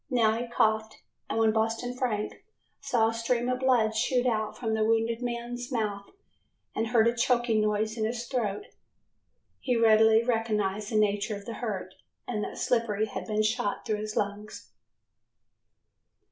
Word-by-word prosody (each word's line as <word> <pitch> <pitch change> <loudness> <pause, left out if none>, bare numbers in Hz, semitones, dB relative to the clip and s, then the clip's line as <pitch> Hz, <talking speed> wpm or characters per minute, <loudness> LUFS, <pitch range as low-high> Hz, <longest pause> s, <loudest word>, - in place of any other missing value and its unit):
Now 235 -5 +3
he 240 +1 -3
coughed 220 -2 0 0.3
and - - -2
when 225 -1 +4
Boston 225 +3 -1
Frank 225 -5 -2 0.4
saw 225 -2 +2
a - - -3
stream 235 +1 0
of 250 0 0
blood 240 -4 +2
shoot 245 +2 +1
out 220 -1 -1
of 220 -1 0
the 220 0 +1
wounded 225 +1 +1
man's 245 +1 -4
mouth 210 -4 -2 0.6
and 225 - -1
heard 225 -1 +4
a 235 - +3
choking 240 -2 +2
noise 215 +1 0
in 215 - +1
his 240 +2 -3
throat, 220 -6 -2 0.9
he 250 -2 0
readily 220 0 +5
recognized 215 -3 -1
the - - -2
nature 210 0 +1
of 200 0 -9
the 230 - -5
hurt 190 -5 -4 0.3
and 215 -4 -2
that - - -6
Slippery 220 -3 +1
had 220 - -6
been 215 -1 +1
shot 215 -1 -1
through 215 - 0
his 215 0 -5
lungs. 205 +1 -4
225 Hz, 160 wpm, -28 LUFS, 215-240 Hz, 0.9 s, readily